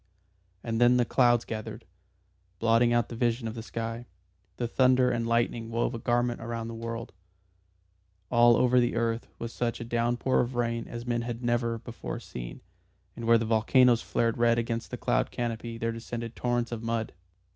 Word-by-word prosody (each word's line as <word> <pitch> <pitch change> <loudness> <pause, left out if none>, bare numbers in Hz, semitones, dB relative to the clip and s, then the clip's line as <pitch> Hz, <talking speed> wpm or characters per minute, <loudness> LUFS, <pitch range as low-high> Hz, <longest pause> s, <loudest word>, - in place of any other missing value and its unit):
And 115 0 -2
then 120 +1 +6
the 120 - +3
clouds 120 -1 +3
gathered, 110 -2 -6 0.7
blotting 115 +1 +3
out 120 -1 +2
the 120 - -6
vision 115 0 0
of 110 - -4
the 115 - -6
sky, 115 +1 -5 0.5
the 120 - -1
thunder 130 +1 +3
and 115 -1 -1
lightning 115 -1 0
wove 115 +2 -1
a 115 - -4
garment 120 0 0
round 115 0 -4
the 115 - -6
world; 115 +1 -6 1.2
all 120 -1 +6
over 125 0 +4
the 120 -1 +1
earth 115 0 -1
was 115 0 -6
such 120 -1 -2
a - - -4
downpour 120 +2 +1
of 125 +1 -3
rain 115 -1 -1
as 120 0 -7
men 120 -1 0
had 120 0 -5
never 120 -1 0
before 115 +1 -7
seen, - - -8 0.5
and 115 - -6
where 115 0 +6
the 115 - -1
volcanoes 115 +2 +4
flared 115 0 0
red 115 0 +4
against 115 0 -2
the - - -5
cloud - - +1
canopy 115 -1 -4
there 115 0 -1
descended 115 0 -6
torrents 120 -1 -1
of 115 -2 -4
mud. 115 -1 -2
115 Hz, 180 wpm, -28 LUFS, 115-120 Hz, 1.2 s, then